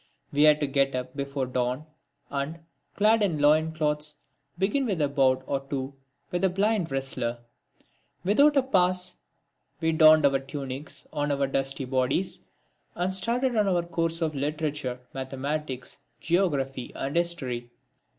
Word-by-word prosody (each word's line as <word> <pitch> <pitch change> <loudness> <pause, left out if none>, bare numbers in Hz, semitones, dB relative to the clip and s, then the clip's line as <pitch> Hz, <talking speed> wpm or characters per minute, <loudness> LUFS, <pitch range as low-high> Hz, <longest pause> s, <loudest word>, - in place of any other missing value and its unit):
We 145 - +2
had 150 0 +6
to - - +3
get 135 -1 +1
up 125 +1 -4
before 140 -1 -2
dawn 125 +3 -2 0.5
and, 140 +3 -3 0.4
clad 215 +2 +4
in 185 -7 +1
loin 155 +2 +4
cloths, 150 -1 -1 0.4
begin 210 +9 +1
with 195 -6 -1
a 145 - +3
bout 130 -2 +2
or 140 - -1
two 135 0 -3 0.4
with 175 +1 -1
a 190 - +5
blind 195 -1 +1
wrestler. 130 -3 -1 0.9
Without 280 +10 +4
a 270 - +5
pause 185 -6 +2 0.6
we 160 -1 +1
donned 155 -1 +7
our 135 -1 +4
tunics 135 +1 -6
on 145 0 -1
our 140 0 +1
dusty 135 0 -2
bodies, 130 +8 -1 0.5
and 180 +2 -1
started 240 +6 +1
on 210 -2 +3
our 175 -3 +2
courses 165 0 -1
of 155 -1 -1
literature, 145 -3 -2
mathematics, 135 0 -4 0.2
geography 140 -8 0
and 140 +3 -3
history. 135 -9 -2
150 Hz, 145 wpm, -27 LUFS, 135-175 Hz, 0.9 s, donned